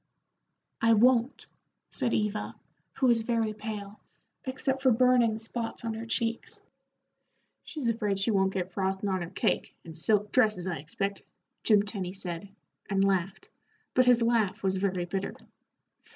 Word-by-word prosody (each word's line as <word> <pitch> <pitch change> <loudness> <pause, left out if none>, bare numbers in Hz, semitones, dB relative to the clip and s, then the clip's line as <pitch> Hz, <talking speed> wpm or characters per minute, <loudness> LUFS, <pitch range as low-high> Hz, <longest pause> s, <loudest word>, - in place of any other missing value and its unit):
"I 230 0 +5
won't," 240 +3 +3 0.5
said 250 -4 +1
Eva, 210 0 -1 0.4
who 265 - 0
was 235 -2 +4
very 225 -2 0
pale, 210 -1 -7 0.5
except 265 0 -2
for 265 - +4
burning 245 -2 +4
spots 230 +1 -5
on 225 - -1
her 225 +1 -6
cheeks. 230 0 -2 1.1
"She's 295 -7 -3
afraid 215 -4 0
she 195 +4 +2
won't 190 -2 +2
get 185 -1 -3
frostin' 190 +1 -1
on 185 -1 0
her 170 - -5
cake, - - -1
and 165 -1 -9
silk 210 +5 +1
dresses, 215 -8 +3
I 180 -3 -2
expect," 195 +7 -3 0.4
Jim 210 -3 +5
Tenny 195 -4 -3
said, 190 0 -6 0.4
and 195 -1 +2
laughed, 190 -1 0 0.4
but 255 - +4
his 245 -1 +5
laugh 230 -5 +1
was 190 0 +1
very 185 -2 -1
bitter. 190 +2 -3
210 Hz, 150 wpm, -29 LUFS, 190-230 Hz, 1.1 s, I